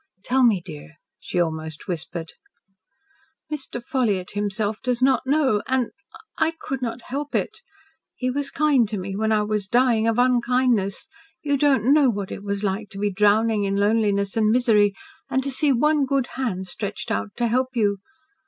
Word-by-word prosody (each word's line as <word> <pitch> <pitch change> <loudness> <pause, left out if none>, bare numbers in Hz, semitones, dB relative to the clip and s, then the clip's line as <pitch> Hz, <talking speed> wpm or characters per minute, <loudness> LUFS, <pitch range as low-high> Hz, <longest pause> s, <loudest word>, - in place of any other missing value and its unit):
"Tell 260 +3 +2
me, 210 -8 +3
dear," 160 -2 -10 0.2
she 180 - -3
almost 160 -2 -3
whispered. 170 -1 -5 1.2
"Mr. 270 -4 -4
Ffolliott 220 -10 -1
himself 205 +1 -2
does 250 -2 -1
not 260 0 +2
know 270 -7 +2
and 260 -2 0 0.5
I 320 +1 +2
could 270 -1 -4
not 235 0 -4
help 285 +3 -5
it. - - -2 0.6
He 255 0 -1
was 280 +1 -1
kind 275 -8 +2
to 215 - -3
me 190 +1 -5
when 220 +2 0
I 215 -1 +3
was 210 -2 -2
dying 235 -1 +3
of 225 0 +1
unkindness. 245 -2 +1 0.4
You 285 -1 +1
don't 275 -3 +3
know 295 -3 +5
what 200 -4 -3
it - - -6
was 200 0 -3
like 200 +1 -2
to 200 - -10
be 205 0 -1
drowning 210 +2 +3
in 195 0 0
loneliness 200 -1 +1
and 215 -1 +3
misery, 215 -4 +3 0.3
and 265 - 0
to 275 - -2
see 285 +2 +2
one 295 +3 +3
good 270 -2 0
hand 215 -8 -2
stretched 200 +2 -5
out 100 0 -2
to 240 - 0
help 255 +3 0
you. 205 -4 +1
225 Hz, 175 wpm, -23 LUFS, 200-260 Hz, 1.2 s, know